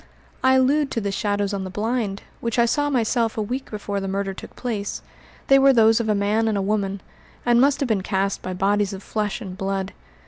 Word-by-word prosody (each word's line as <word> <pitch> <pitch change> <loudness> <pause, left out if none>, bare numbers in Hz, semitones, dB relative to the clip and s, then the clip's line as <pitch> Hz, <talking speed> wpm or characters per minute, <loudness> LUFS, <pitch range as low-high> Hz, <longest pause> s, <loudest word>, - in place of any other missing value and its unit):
"I 260 0 +5
allude 275 +3 +3
to - - 0
the 200 -2 -2
shadows 205 0 -1
on 195 -1 -2
the 190 - -5
blind, 210 0 -2 0.2
which 230 0 -2
I 235 - +5
saw 290 +5 +1
myself 230 -3 +1
a - - 0
week 255 +5 -4
before 205 -1 -3
the 195 - -4
murder 195 0 -2
took - - -11
place. 215 -5 -4 0.4
They 275 0 +6
were 270 0 +6
those 225 -1 +5
of 225 -2 -1
a 210 - +3
man 210 +3 +1
and 215 -2 +1
a - - +1
woman, 200 -1 -1 0.4
and 240 0 +4
must 280 0 +3
have 275 - +1
been 215 -5 +1
cast 195 0 -1
by 185 - -4
bodies 200 +1 +1
of 195 0 -8
flesh 210 +1 -2
and 190 -4 -7
blood. 195 0 -3
210 Hz, 230 wpm, -23 LUFS, 195-240 Hz, 0.4 s, They